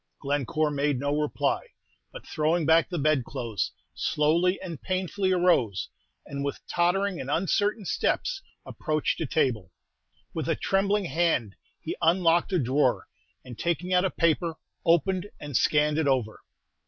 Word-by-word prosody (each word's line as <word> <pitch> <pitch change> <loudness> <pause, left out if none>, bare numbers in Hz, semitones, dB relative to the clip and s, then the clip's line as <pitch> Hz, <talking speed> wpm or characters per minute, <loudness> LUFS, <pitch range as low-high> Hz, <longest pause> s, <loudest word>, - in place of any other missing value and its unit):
Glencore 145 +2 0
made 145 -1 0
no 145 +2 0
reply, 150 -1 0 0.5
but, - - -10
throwing 160 +1 0
back 160 +1 +4
the 175 - -3
bedclothes, 125 - -1 0.2
slowly 170 +5 +1
and 170 -6 -7
painfully 185 +1 -1
arose, 175 - +2 0.4
and 140 0 -5
with 140 - -3
tottering 180 +2 0
and 130 - -6
uncertain 205 +6 0
steps 390 - -1 0.2
approached 155 0 -2
a 160 - -1
table. 115 - 0 0.6
With - - -3
a - - +2
trembling 195 +1 +1
hand 160 - 0 0.2
he - - -5
unlocked 170 +1 +3
a 185 - +2
drawer, 130 -2 +1 0.4
and 125 -3 -10
taking 175 +2 -1
out 180 0 +4
a 190 - +2
paper, 165 -1 +1 0.3
opened 175 +4 +2
and 145 -2 -7
scanned 150 +3 +3
it 155 - +1
over. 125 -6 0
160 Hz, 140 wpm, -27 LUFS, 140-180 Hz, 0.6 s, back